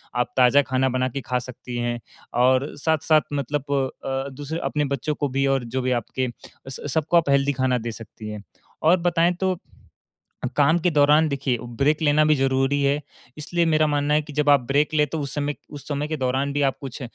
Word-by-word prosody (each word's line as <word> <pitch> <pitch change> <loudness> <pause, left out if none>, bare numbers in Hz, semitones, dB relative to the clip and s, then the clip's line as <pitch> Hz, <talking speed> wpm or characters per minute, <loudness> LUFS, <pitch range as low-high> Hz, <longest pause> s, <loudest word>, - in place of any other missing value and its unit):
आप 125 0 0
ताज़ा 130 +3 +6
खाना 130 0 +2
बना 130 0 0
के 135 +2 -5
खा 125 0 0
सकती 125 0 -8
हैं। 120 0 -2 0.4
और 130 +2 +3
साथ-साथ 155 0 +2
मतलब 145 0 -2 0.4
अ, - - -3
अ, 135 +1 -2
दूसरे 145 +4 -5
अपने 150 -1 0
बच्चों 150 +4 -3
को 145 - -1
भी 135 +1 0
और 135 -2 +1
जो 130 - +1
भी 130 - -1
आपके 130 +3 -3 0.4
स - - -7
स 145 - -6
सबको 160 +2 +2
आप 165 -4 +2
हेल्थी 140 0 +3
खाना 130 -1 +1
दे 115 0 -4
सकती 110 -1 -10
हैं। 105 - -5 0.5
और 170 +4 +5
बताएँ 175 0 +2
तो, 185 -2 0 1.0
काम 150 +3 +4
के 180 - +2
दौरान 150 +1 +4
देखिए 140 -3 -1 0.2
ब्रेक 150 +3 +2
लेना 150 0 +4
भी 150 0 +4
ज़रूरी 135 +1 +1
है, 140 +2 +1 0.4
इसलिए 170 +3 0
मेरा 155 -1 +3
मानना 145 0 +1
है 150 - +3
कि 150 0 -11
जब 150 0 +1
आप 140 -3 +6
ब्रेक 145 +3 +1
ले 150 -1 +3
तो 160 +1 -4
उस 140 -1 -5
समय 145 0 -1
उस 145 -2 -10
समय 145 0 -2
के 155 - -3
दौरान 135 +1 0
भी 145 - 0
आप 135 -1 +1
कुछ 135 -2 -7
140 Hz, 215 wpm, -23 LUFS, 130-150 Hz, 1.0 s, ताज़ा